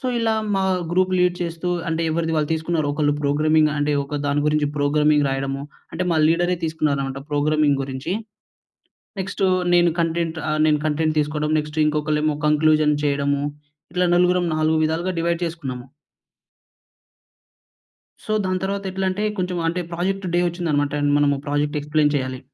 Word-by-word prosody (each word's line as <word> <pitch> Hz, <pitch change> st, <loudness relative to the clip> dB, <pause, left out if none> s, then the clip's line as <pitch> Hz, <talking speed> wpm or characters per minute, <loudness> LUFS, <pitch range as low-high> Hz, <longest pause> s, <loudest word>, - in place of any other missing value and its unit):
So -, -, -4 dB
ఇలా 225 Hz, -1 st, +1 dB, 0.2 s
మా 195 Hz, -, +1 dB, 0.3 s
group 185 Hz, +1 st, +2 dB
lead 180 Hz, 0 st, +3 dB
చేస్తూ 170 Hz, 0 st, -3 dB, 0.2 s
అంటే 165 Hz, 0 st, -1 dB
ఎవరిది 165 Hz, 0 st, -1 dB
వాళ్ళు 150 Hz, -2 st, 0 dB
తీసుకున్నారు. 160 Hz, -1 st, -1 dB
ఒకళ్ళు 145 Hz, 0 st, +1 dB
ప్రోగ్రామింగ్ 155 Hz, +2 st, +3 dB
అంటే 145 Hz, 0 st, 0 dB
ఒక 140 Hz, +1 st, -5 dB
దాని 145 Hz, +1 st, +1 dB
గురించి 150 Hz, -1 st, +2 dB
ప్రోగ్రామింగ్ 150 Hz, 0 st, +3 dB
రాయడము. 135 Hz, +1 st, -2 dB, 0.3 s
అంటే 185 Hz, -, -2 dB
మా 165 Hz, -, +2 dB
లీడరే 175 Hz, +2 st, +2 dB
తీసుకున్నారన్నమాట 140 Hz, -4 st, -1 dB
ప్రోగ్రామింగ్ 145 Hz, -1 st, +2 dB
గురించి. 135 Hz, +5 st, -4 dB, 1.1 s
నెక్స్ట్ 195 Hz, +1 st, -3 dB, 0.3 s
నేను 175 Hz, -1 st, +4 dB
కంటెంట్ 165 Hz, 0 st, -1 dB
ఆహ్, 155 Hz, 0 st, 0 dB
నేను 150 Hz, -1 st, +3 dB
కంటెంట్ 155 Hz, +1 st, 0 dB
తీసుకోవడం, 150 Hz, +1 st, -1 dB
నెక్స్ట్ 150 Hz, +1 st, -5 dB
ఇంకొకళ్లేమో 150 Hz, 0 st, 0 dB
కంక్లూజన్ 150 Hz, 0 st, +3 dB
చేయడము 140 Hz, 0 st, 0 dB, 0.5 s
ఇట్లా 180 Hz, 0 st, +2 dB
నలుగురం 180 Hz, 0 st, +3 dB
నాలుగు 155 Hz, 0 st, +2 dB
విధాలుగా 165 Hz, +4 st, 0 dB
డివైడ్ 170 Hz, +1 st, 0 dB
చేసుకున్నాము. 135 Hz, -7 st, -5 dB, 2.4 s
సో 215 Hz, -, -1 dB
దాని 185 Hz, 0 st, 0 dB
తరువాత 200 Hz, +1 st, -2 dB
ఎట్లంటే 190 Hz, +2 st, -1 dB
కొంచెం 180 Hz, -1 st, -2 dB
అంటే 175 Hz, +2 st, -1 dB
ప్రాజెక్టు 185 Hz, +2 st, -2 dB
డే 175 Hz, -, +3 dB
వచ్చిందనమాట. 155 Hz, -5 st, -1 dB, 0.2 s
మనము 145 Hz, -1 st, +3 dB
ప్రాజెక్టు 145 Hz, +1 st, 0 dB
ఎక్స్‌ప్లైన్ 150 Hz, 0 st, +1 dB
చేయాలి. 130 Hz, -2 st, -2 dB
155 Hz, 145 wpm, -22 LUFS, 145-175 Hz, 2.4 s, నేను